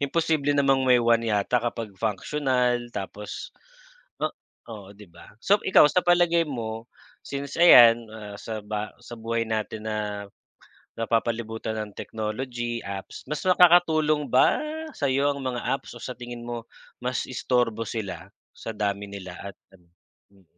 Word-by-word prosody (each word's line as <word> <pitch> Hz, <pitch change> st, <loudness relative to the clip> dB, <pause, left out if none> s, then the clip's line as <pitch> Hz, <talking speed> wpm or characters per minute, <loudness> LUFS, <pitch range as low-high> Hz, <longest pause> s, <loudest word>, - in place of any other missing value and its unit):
Imposible 145 Hz, 0 st, +1 dB
namang 135 Hz, -1 st, +3 dB
may 125 Hz, -, +7 dB
1 115 Hz, -1 st, +2 dB
yata 105 Hz, +3 st, +1 dB
kapag 115 Hz, -3 st, -4 dB
functional, 120 Hz, +4 st, 0 dB
tapos 105 Hz, -2 st, -7 dB, 0.7 s
oh -, -, 0 dB, 0.4 s
oo 100 Hz, -3 st, -10 dB
'di 105 Hz, -2 st, -14 dB
ba. 85 Hz, 0 st, -15 dB, 0.2 s
So 205 Hz, +1 st, +4 dB
ikaw 190 Hz, -, +6 dB
sa 180 Hz, -, +4 dB
palagay 175 Hz, -1 st, +4 dB
mo, 115 Hz, -3 st, -5 dB, 0.4 s
since 140 Hz, 0 st, -5 dB
ayan, 120 Hz, -8 st, +8 dB
ah, 105 Hz, -2 st, -8 dB
sa 110 Hz, -2 st, -6 dB
ba 105 Hz, 0 st, -4 dB
sa -, -, -13 dB
buhay 115 Hz, 0 st, -2 dB
natin 110 Hz, -1 st, -3 dB
na 105 Hz, -1 st, -3 dB, 0.8 s
napapalibutan 115 Hz, -1 st, -1 dB
ng 105 Hz, -2 st, -6 dB
technology, 120 Hz, +2 st, -4 dB
apps, 100 Hz, -1 st, -7 dB
mas 150 Hz, 0 st, -3 dB
makakatulong 160 Hz, -5 st, +5 dB
ba 125 Hz, +2 st, +4 dB, 0.3 s
sa 140 Hz, -, -1 dB
'yo 140 Hz, +2 st, +2 dB
ang 140 Hz, -, -7 dB
mga 125 Hz, -2 st, -3 dB
apps, 135 Hz, -, -3 dB
o -, -, -10 dB
sa 125 Hz, -, -4 dB
tingin 120 Hz, -1 st, -8 dB
mo 120 Hz, -1 st, -6 dB, 0.3 s
mas 125 Hz, +1 st, -2 dB
istorbo 120 Hz, -3 st, 0 dB
sila 95 Hz, -5 st, -5 dB, 0.2 s
sa 115 Hz, -, -7 dB
dami 100 Hz, -1 st, -2 dB
nila 95 Hz, -2 st, -8 dB
at 100 Hz, -1 st, -8 dB, 0.2 s
ano? 90 Hz, -2 st, -22 dB, 0.4 s
Mm. 100 Hz, -1 st, -24 dB
115 Hz, 150 wpm, -25 LUFS, 105-135 Hz, 0.8 s, ayan